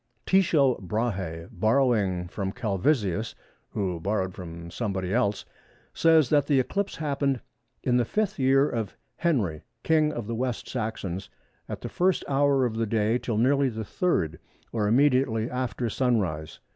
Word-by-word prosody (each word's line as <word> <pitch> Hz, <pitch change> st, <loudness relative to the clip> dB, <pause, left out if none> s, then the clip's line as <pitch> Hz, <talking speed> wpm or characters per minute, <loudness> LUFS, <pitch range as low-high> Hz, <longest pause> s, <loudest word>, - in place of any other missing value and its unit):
Tycho 155 Hz, -9 st, +3 dB
Brahe, 95 Hz, -5 st, -2 dB
borrowing 110 Hz, -7 st, +2 dB
from 95 Hz, +2 st, -3 dB
Calvisius, 110 Hz, -, 0 dB, 0.3 s
who 95 Hz, -4 st, -2 dB
borrowed 95 Hz, 0 st, -1 dB
from 85 Hz, -2 st, -8 dB
somebody 95 Hz, -3 st, -2 dB
else, 110 Hz, -4 st, +1 dB, 0.5 s
says 160 Hz, -5 st, +4 dB
that 145 Hz, -2 st, +3 dB
the 140 Hz, -3 st, +4 dB
eclipse 200 Hz, +10 st, -1 dB
happened 140 Hz, -4 st, 0 dB, 0.4 s
"in 125 Hz, -1 st, +2 dB
the 120 Hz, -, +3 dB
5th 205 Hz, -, -1 dB
year 135 Hz, +2 st, +4 dB
of 110 Hz, -7 st, -4 dB, 0.2 s
Henry, 110 Hz, -, 0 dB, 0.2 s
King 155 Hz, -1 st, +3 dB
of 120 Hz, -6 st, -5 dB
the 115 Hz, -, -4 dB
West 125 Hz, 0 st, -2 dB
Saxons, 100 Hz, -6 st, -4 dB, 0.4 s
at -, -, -5 dB
the -, -, -4 dB
1st 185 Hz, 0 st, +1 dB
hour 140 Hz, -1 st, +3 dB
of 110 Hz, -2 st, -2 dB
the 115 Hz, 0 st, 0 dB
day 110 Hz, +2 st, +1 dB
till 115 Hz, -4 st, -2 dB
nearly 135 Hz, +4 st, +3 dB
the 110 Hz, -2 st, -5 dB
3rd, 95 Hz, -, -1 dB, 0.3 s
or 105 Hz, -3 st, 0 dB
immediately 125 Hz, -2 st, +3 dB
after 125 Hz, -1 st, -2 dB
sunrise." 95 Hz, -11 st, -1 dB
115 Hz, 145 wpm, -26 LUFS, 100-135 Hz, 0.5 s, says